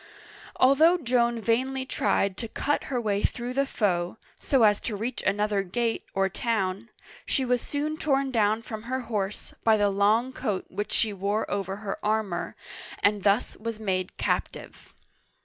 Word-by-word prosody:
Although 310 +7 +5
Joan 240 -5 +1
vainly 260 +4 0
tried 200 -6 +1
to 230 - -3
cut 290 +6 -1
her 255 -3 -1
way 205 -3 0
through 245 +3 -2
the 275 +1 +1
foe, 180 -5 0 0.2
so 265 -4 +2
as 210 -1 +4
to 215 - -3
reach 225 +5 -3
another 205 0 +1
gate 225 +5 -1
or 195 0 +3
town, 200 0 -2 0.3
she 265 - 0
was 250 -1 +1
soon 300 +2 -3
torn 275 -3 +1
down 220 -1 +2
from 220 -1 -6
her 260 0 -1
horse 210 -4 -3
by 220 -1 +5
the 205 -1 +2
long 215 +6 +2
coat 210 -8 -2
which 205 - -4
she 220 -2 +1
wore 200 +3 -1
over 195 -1 -2
her 205 -1 -6
armor, 210 -5 -1 0.5
and 205 0 +3
thus 205 +4 +2
was 230 0 -5
made 185 -3 -2
captive. - - -3
220 Hz, 165 wpm, -27 LUFS, 200-250 Hz, 0.5 s, Although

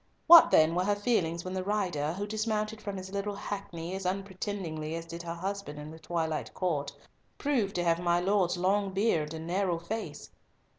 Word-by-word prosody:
What 340 -1 +10
then 155 +1 +5
were 180 +1 +1
her 205 0 +2
feelings 185 -6 0
when 185 - -4
the 185 -1 -2
rider, 180 -7 -1
who 200 +3 -3
dismounted 215 0 -2
from 200 -2 -5
his 190 0 -7
little 200 +1 -2
hackney 185 -4 -5
as 190 0 -4
unpretendingly 185 -4 -3
as 165 0 -5
did 170 +1 -7
her 170 0 -5
husband 195 -3 -4
in 150 +1 -7
the 160 - -11
twilight 160 -1 -2
court, 155 -6 -1 0.5
proved 240 -9 0
to 175 - 0
have 170 -1 +2
my 175 0 +2
Lord's 185 -1 +2
long 195 +2 +1
beard 180 -7 +1
and 160 0 -6
narrow 180 0 0
face! 210 +7 -6
185 Hz, 190 wpm, -30 LUFS, 165-205 Hz, 0.5 s, What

